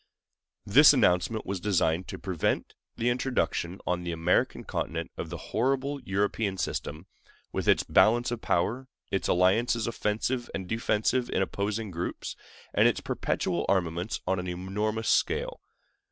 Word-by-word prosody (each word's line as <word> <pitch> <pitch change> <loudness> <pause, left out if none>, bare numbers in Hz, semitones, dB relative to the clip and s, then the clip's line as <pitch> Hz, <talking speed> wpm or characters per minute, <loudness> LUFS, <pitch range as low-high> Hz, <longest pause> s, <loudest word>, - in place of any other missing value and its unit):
This 145 +9 +8
announcement 110 -2 +2
was 95 0 -3
designed 90 -3 +1
to - - -6
prevent 90 -4 -1 0.2
the 120 +2 +1
introduction 120 -8 -1
on 90 0 0
the 85 - -3
American 85 +2 +1
continent 85 0 -3
of 80 - -5
the 85 - -5 0.2
horrible 135 +4 0
European 100 -1 -1
system—with 80 -1 -6
its - - +4
balance 120 +3 +4
of 120 -1 -3
power, 110 +10 0 0.2
its 95 - 0
alliances 110 +6 +3
offensive 115 +2 -1
and 95 -2 -4
defensive 115 +3 0
in 95 - +1
opposing 105 +2 -3
groups, 85 0 -4 0.4
and - - +5
its - - +1
perpetual 85 -2 -1
armaments 90 +1 0
on 95 -1 0
an 90 - -4
enormous 105 +5 -2
scale. - - +1
100 Hz, 140 wpm, -28 LUFS, 90-115 Hz, 0.4 s, This